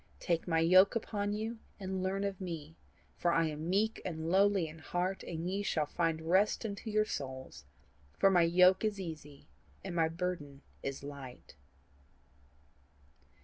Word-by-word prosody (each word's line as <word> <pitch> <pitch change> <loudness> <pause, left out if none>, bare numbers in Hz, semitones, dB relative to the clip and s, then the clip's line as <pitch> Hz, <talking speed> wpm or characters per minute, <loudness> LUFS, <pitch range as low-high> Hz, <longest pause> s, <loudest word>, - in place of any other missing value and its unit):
TAKE 170 0 -1
MY 165 -2 +2
YOKE 185 +6 +6
UPON 205 -2 -2
YOU, 220 +2 -3 0.2
AND 190 -1 -3
LEARN 190 +1 -1
OF 200 -1 -3
ME; 165 -4 -6 0.4
FOR 175 - +2
I 165 0 +3
AM 155 +2 -5
MEEK 215 +4 +1
AND 160 -2 -3
LOWLY 195 -2 +4
IN 155 +1 -11
HEART: 180 +5 -2
AND 165 0 -5
YE 195 +2 -1
SHALL 160 -6 0
FIND 165 +1 -1
REST 190 +7 +2
UNTO 210 +1 -5
YOUR 215 0 +2
SOULS. 130 - -6 0.5
FOR 195 - +5
MY 180 -2 +5
YOKE 180 +3 +5
IS 210 -2 0
EASY 150 -5 -8 0.4
AND 190 - -5
MY 165 -2 +3
BURDEN 165 -5 -4 0.2
IS 140 0 -5
LIGHT." 140 -3 -9
175 Hz, 155 wpm, -33 LUFS, 160-195 Hz, 0.5 s, YOKE